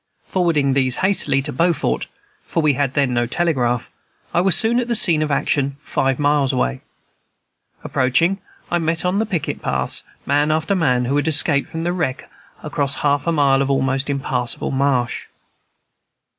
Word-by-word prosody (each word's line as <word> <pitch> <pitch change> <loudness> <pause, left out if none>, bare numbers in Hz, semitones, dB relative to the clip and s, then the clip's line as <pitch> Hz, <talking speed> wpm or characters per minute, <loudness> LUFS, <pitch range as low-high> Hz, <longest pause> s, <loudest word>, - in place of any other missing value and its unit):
Forwarding 160 -7 +1
these 130 -2 +2
hastily 145 -8 +1
to 150 - -5
Beaufort 170 +4 0 0.3
(for 165 - -2
we 150 -2 +4
had 135 -1 -1
then 140 -4 +1
no 120 0 +1
telegraph), 125 -7 0 0.4
I 175 - +3
was 185 -2 +3
soon 230 +4 +2
at 245 - -2
the 235 - 0
scene 170 -8 +4
of 155 - 0
action, 140 -1 0
five 135 -2 -1
miles 145 -2 +2
away. 65 - -1 1.0
Approaching, 165 +10 +1 0.3
I 175 - +2
met 165 +1 -1
on 185 +3 +1
the 220 - 0
picket 175 -8 -3
paths - - -1 0.2
man 145 +2 +2
after 155 +4 +1
man 125 -9 +1
who 135 +4 0
had 145 +1 0
escaped 145 -2 +2
from 165 0 -5
the 175 +1 0
wreck 160 -8 -3 0.4
across 145 -2 -1
a - - -7
half 145 +2 +1
mile 140 -5 +3
of 140 - 0
almost 135 0 0
impassable 130 -3 -2
marsh. 135 -3 0
145 Hz, 170 wpm, -20 LUFS, 135-165 Hz, 1.0 s, we